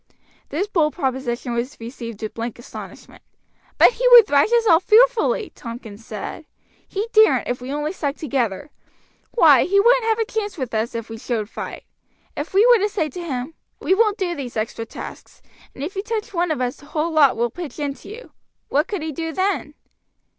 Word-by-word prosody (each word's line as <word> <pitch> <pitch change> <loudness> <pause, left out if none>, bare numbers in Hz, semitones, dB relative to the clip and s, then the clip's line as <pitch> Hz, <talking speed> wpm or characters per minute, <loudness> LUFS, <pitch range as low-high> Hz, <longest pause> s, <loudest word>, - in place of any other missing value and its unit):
This 330 +7 -1
bold 330 -8 +1
proposition 260 -5 -2
was 240 +4 -3
received 230 -2 -8
with 215 - -4
blank 230 0 -5
astonishment. 240 - -11 0.6
"But - - +7
he - - 0
would 485 -3 +10
thrash 290 +3 +3
us 470 -1 +3
all 330 -6 +6
fearfully," 450 +1 +3
Tompkins 230 -3 -9
said. 220 +9 -7 0.4
"He 410 +3 -3
daren't 435 0 +5
if 245 0 -3
we 255 +2 -6
only 295 +3 -2
stuck 285 -6 -3
together. 265 -2 -2 0.6
Why, - - +5
he 400 +2 +3
wouldn't 475 +3 +4
have 445 -1 +2
a 450 - 0
chance 430 -4 -4
with 255 -5 -4
us 225 +2 -1
if 230 -1 -4
we 225 - -7
showed 220 -3 -3
fight. - - -7 0.5
If 290 +3 -5
we 395 +4 +5
were 485 -2 +6
to 415 +2 +1
say 380 -7 -1
to 350 +6 -7
him, 270 -1 -4 0.3
'We - - +1
won't 425 +1 +2
do 360 -3 -1
these 260 -7 -6
extra 225 +1 -3
tasks; - - -10 0.4
and 270 - -6
if 355 +7 -5
you 390 - -1
touch 435 -1 -4
one 350 -1 0
of 305 -5 -1
us 250 0 -2
the - - -16
whole 315 +2 -1
lot 300 -4 +4
will 235 0 0
pitch 340 +1 -8
into 285 -2 -5
you,' 470 +4 -10 0.4
what 295 +3 +1
could 395 -7 -4
he 315 - -3
do 325 +2 -4
then?" 370 -4 -1
305 Hz, 200 wpm, -21 LUFS, 245-405 Hz, 0.6 s, would